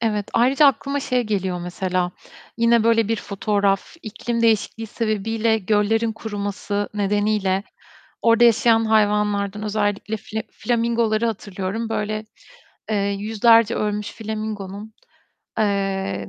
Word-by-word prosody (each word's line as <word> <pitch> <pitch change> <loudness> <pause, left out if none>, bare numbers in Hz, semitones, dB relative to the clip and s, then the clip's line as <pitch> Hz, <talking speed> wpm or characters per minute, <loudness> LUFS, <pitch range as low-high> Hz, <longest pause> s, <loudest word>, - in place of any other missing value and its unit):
Evet. 210 -3 -1
Ayrıca 270 +5 +4
aklıma 280 +1 +1
şey 250 -2 0
geliyor 190 -5 -2
mesela. 180 0 -2 0.5
Yine 230 -1 +3
böyle 230 -2 +3
bir 225 - +1
fotoğraf. 200 +2 -1
İklim 230 +2 -3
değişikliği 225 0 +1
sebebiyle 220 +1 0
göllerin 220 +2 +1
kuruması 205 -1 -4
nedeniyle 205 -1 +1 0.6
orada 230 +1 +4
yaşayan 225 -1 +4
hayvanlardan 210 -1 +1
özellikle 210 0 -1
fla 220 +1 -5
flamingoları 230 -2 0
hatırlıyorum. 205 0 -3
Böyle, 215 0 -2 0.7
eee, 215 - +1 0.2
yüzlerce 225 +2 +4
ölmüş 210 0 -2
flamingonun, 215 -1 -6 0.7
eee, 195 - -1
215 Hz, 105 wpm, -22 LUFS, 200-225 Hz, 0.7 s, Ayrıca